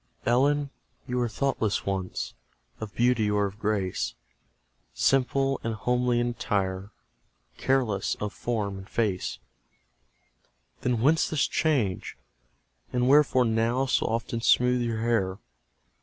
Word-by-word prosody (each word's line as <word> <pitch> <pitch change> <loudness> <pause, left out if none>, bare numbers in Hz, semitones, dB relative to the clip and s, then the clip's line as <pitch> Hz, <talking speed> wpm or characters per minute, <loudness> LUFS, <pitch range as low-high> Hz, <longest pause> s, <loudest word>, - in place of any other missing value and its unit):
Ellen, 140 +4 +2 0.4
you 125 - -2
were 120 -1 +1
thoughtless 110 -4 -1
once 95 -2 -3 0.5
Of 110 -2 -7
beauty 120 -3 +2
or 105 0 +2
of 100 +1 -6
grace, 100 -4 -1 0.8
Simple 135 - +2
and 115 -1 -2
homely 125 +2 +1
in 120 0 +1
attire, 100 -5 -2 0.7
Careless 120 -7 +1
of 105 -1 -4
form 105 -5 -2
and 95 - -12
face; 105 -6 -1 1.4
Then 120 -3 0
whence 155 +6 +3
this 155 -3 +1
change? 130 - 0 0.7
and 125 0 +1
wherefore 140 -3 +5
now 115 +3 +1
So 130 - +1
often 115 +1 -2
smoothe 125 +1 +4
your 115 -2 -2
hair? 100 -5 +1
115 Hz, 120 wpm, -27 LUFS, 105-125 Hz, 1.4 s, wherefore